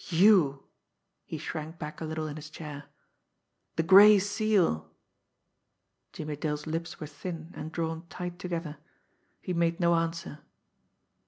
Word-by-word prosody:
"You!" 170 -6 +5 0.6
he - - -5
shrank 155 +2 -6
back 150 0 -7
a - - -2
little 155 0 -3
in 150 -1 -5
his 155 0 -8
chair. 150 -2 -8 0.9
"The 165 - +1
Gray 205 +4 +9
Seal!" 200 - +1 1.2
Jimmie 150 -1 -5
Dale's 150 0 -3
lips 165 +2 -4
were 155 - -5
thin 160 +3 -7
and 155 - -6
drawn 165 0 -3
tight 180 0 -6
together. 170 -4 -4 0.7
He 180 - -2
made 170 +1 +1
no 170 -1 +4
answer. 165 -2 -2
165 Hz, 135 wpm, -29 LUFS, 155-175 Hz, 1.2 s, Gray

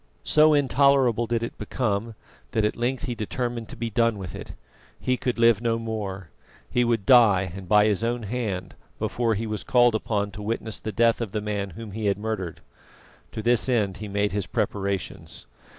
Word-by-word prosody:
So 155 0 +5
intolerable 135 -4 +3
did 115 0 0
it 115 - -6
become, 115 -2 -2 0.4
that 110 - +2
at 105 - 0
length 125 +2 -1
he 125 - -2
determined 120 +1 -3
to 135 - -8
be 115 -1 -4
done 115 0 +2
with 95 -3 -7
it. - - -8 0.5
He 130 - +1
could 125 0 -2
live 115 -2 +4
no 115 -1 +1
more. 105 -6 -5 0.4
He 125 - +1
would 115 -4 0
die, 100 -8 +5
and 95 -2 -9
by 105 0 +6
his 105 0 +1
own 120 0 -1
hand, 105 -4 -3 0.2
before 115 -2 0
he 110 +3 -3
was 105 -2 -4
called 120 -2 +4
upon 105 -2 -1
to 105 - -9
witness 110 +1 -3
the 110 - -4
death 115 +3 +2
of 110 -4 -4
the 105 - 0
man 105 -1 -3
whom 115 -3 -7
he 105 +1 -3
had 100 - +1
murdered. 105 -5 -4 0.7
To 110 - -5
this 120 +2 +2
end 105 -6 +1
he 105 - -6
made 100 0 0
his 100 -2 -2
preparations. 100 -9 -3
110 Hz, 195 wpm, -25 LUFS, 100-120 Hz, 0.7 s, by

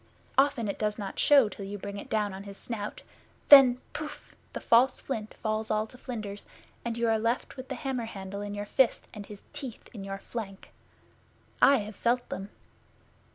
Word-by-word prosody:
Often 270 -5 +3
it 200 - -3
does 210 -1 0
not 200 -3 -5
show 280 -6 +6
till 205 - -8
you 200 +1 -5
bring 200 +1 -6
it - - -10
down 210 -2 0
on 190 - -7
his 200 -1 -9
snout. 210 -3 -5 0.5
Then 270 -4 +10 0.2
Pouf! 300 -1 -7 0.2
the - - -4
false 250 +3 +4
flint 220 -5 -5
falls 215 0 -2
all 215 0 +1
to 225 - -13
flinders, 215 -6 -6 0.4
and 235 -1 -3
you 235 0 +1
are 225 -1 +3
left 230 +3 -1
with 260 0 -8
the 265 - -3
hammer 255 -2 -3
handle 200 -2 -6
in 205 0 -5
your 205 0 -4
fist, 250 +3 +2
and 205 -2 -8
his 205 -1 -11
teeth 255 -5 -7
in 205 -4 -7
your 195 0 -4
flank! 195 -2 -7 0.9
I 280 - +7
have 210 0 -9
felt 245 +1 +1
them. 195 +1 -5
220 Hz, 195 wpm, -29 LUFS, 205-245 Hz, 0.9 s, Then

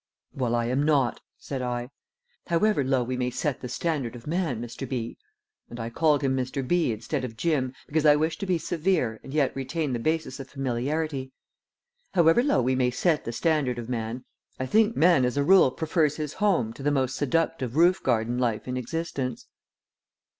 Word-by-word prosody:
"Well, 120 -3 0
I 120 0 0
am 130 +4 0
not," 145 -5 +2 0.2
said 135 -2 -5
I. 125 0 -3 0.6
"However 175 -1 +2
low 130 -1 +1
we 125 +2 -3
may 125 0 0
set 135 +2 -2
the 125 - -5
standard 130 -3 -2
of 120 - -11
man, 160 -7 -1
Mr. 120 +2 -6
B." 120 -3 -3 0.5
and 120 - -8
I 115 +1 -4
called 150 +1 +2
him 135 -1 +1
Mr. 130 0 -2
B. 175 -4 +2
instead 120 +6 -3
of 115 -3 -6
Jim, 135 -4 0
because 155 0 0
I 150 -1 +7
wished 155 +1 -1
to 200 - -4
be 180 -2 +2
severe 160 -9 0
and 135 - -9
yet 145 -2 +1
retain 140 +1 -2
the 120 - -1
basis 155 0 -1
of 135 - -8
familiarity 135 +1 -2 0.8
"however 170 +4 +5
low 255 - +2
we 130 +2 +2
may 130 -1 +2
set 155 +5 0
the 115 - -3
standard 140 -2 0
of 120 0 -6
man, 120 +1 -4 0.3
I 130 - -1
think 220 - +3
man 165 -5 +5
as 125 +2 0
a 140 - +3
rule 185 -2 +6
prefers 155 +1 0
his 150 -1 -4
home 175 - +1
to - - -11
the 145 - +1
most 130 -2 0
seductive 145 -3 -1
roof 175 +3 +4
garden 120 0 0
life 120 -3 -1
in 125 0 -2
existence." 130 -1 -4
135 Hz, 195 wpm, -26 LUFS, 125-160 Hz, 0.8 s, I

